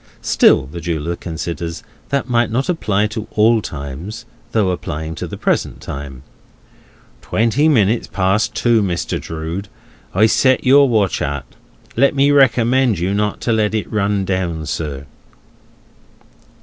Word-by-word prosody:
Still - - +4
(the 75 +6 -8
jeweller 85 0 -2
considers) 85 0 -5 0.3
that 140 -2 -1
might 120 -2 +2
not 130 +7 -1
apply 105 - +1
to 110 0 -5
all 110 +1 +4
times, 80 - -7 0.3
though 105 -5 +2
applying 80 -2 -4
to - - -5
the - - -7
present - - -1
time. 70 -2 -7 1.0
"Twenty 115 +8 +1
minutes 115 -5 +2
past 95 +2 0
two, 120 -2 +3
Mr. 90 -4 -2
Drood, 80 +5 -5 0.5
I 105 +4 +5
set 130 +3 +3
your 140 +1 +6
watch 105 -5 +1
at. 70 -2 -3 0.5
Let 140 +4 +3
me 140 +1 +4
recommend 130 -4 +3
you 90 +4 -1
not 105 0 -1
to 115 - 0
let 110 0 +1
it 110 - -3
run 100 -2 0
down, 90 -4 -2
sir." 70 -2 -4
105 Hz, 140 wpm, -18 LUFS, 85-115 Hz, 1.0 s, your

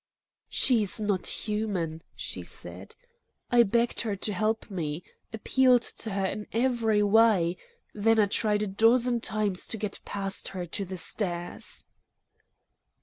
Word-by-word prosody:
"She's 220 -6 +3
not 205 -3 -1
human," 200 -7 -2
she - - -4
said. - - -9 0.6
"I 240 -1 +6
begged 235 +2 +1
her 215 -3 -2
to 205 +2 -2
help 215 +2 -1
me, 160 -3 -3 0.3
appealed 250 +2 +3
to 225 - -2
her 195 -1 -1
in 210 +2 -4
every 230 -3 +2
way; 205 -5 +4 0.4
then 225 +2 +2
I 210 - +6
tried 210 +1 +1
a - - -1
dozen 235 +4 +3
times 210 -4 -1
to 225 - -3
get 210 -1 -4
past 195 -1 -3
her 180 - -3
to 195 +4 -4
the 185 0 -6
stairs." 175 -1 -3
210 Hz, 140 wpm, -28 LUFS, 190-225 Hz, 0.6 s, I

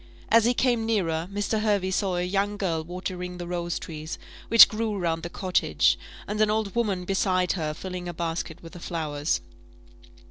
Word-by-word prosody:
As 225 0 +6
he 245 +1 +3
came 240 -3 +2
nearer, 175 -7 0
Mr. 205 +2 -1
Hervey 200 -3 +1
saw 190 -1 0
a 175 - 0
young 200 +3 0
girl 165 -5 -1
watering 180 +1 -5
the 175 - -5
rose 175 -1 -2
trees, 155 0 -6 0.3
which 230 - +10
grew 215 -1 -2
round 165 -3 -1
the 170 - -5
cottage, 185 0 +2 0.3
and 210 +1 -1
an 215 - +4
old 215 -2 0
woman 205 -6 0
beside 185 -1 +1
her 155 -4 -2
filling 180 +1 -6
a 175 - -4
basket 165 0 -4
with 165 - -11
the 175 - -9
flowers. 150 - -2
185 Hz, 180 wpm, -26 LUFS, 170-205 Hz, 0.3 s, which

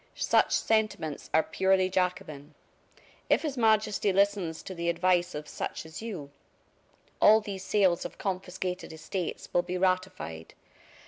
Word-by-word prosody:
Such - - +2
sentiments 215 -9 0
are 160 - +4
purely 190 -1 +2
Jacobin. 160 -6 -2 0.7
If - - +3
His 295 -4 -2
Majesty 215 -3 +2
listens 195 -4 +1
to 190 - -7
the 170 -1 -2
advice 175 0 +1
of 150 0 -6
such - - -5
as 160 +5 -9
you, 180 -11 -6 0.9
all 215 +1 +8
these 200 -3 -6
sales 190 -5 +2
of - - -7
confiscated 185 -1 -4
estates 160 +3 -5
will 175 - +4
be 180 +1 -4
ratified. 185 - -2
185 Hz, 135 wpm, -29 LUFS, 170-200 Hz, 0.9 s, all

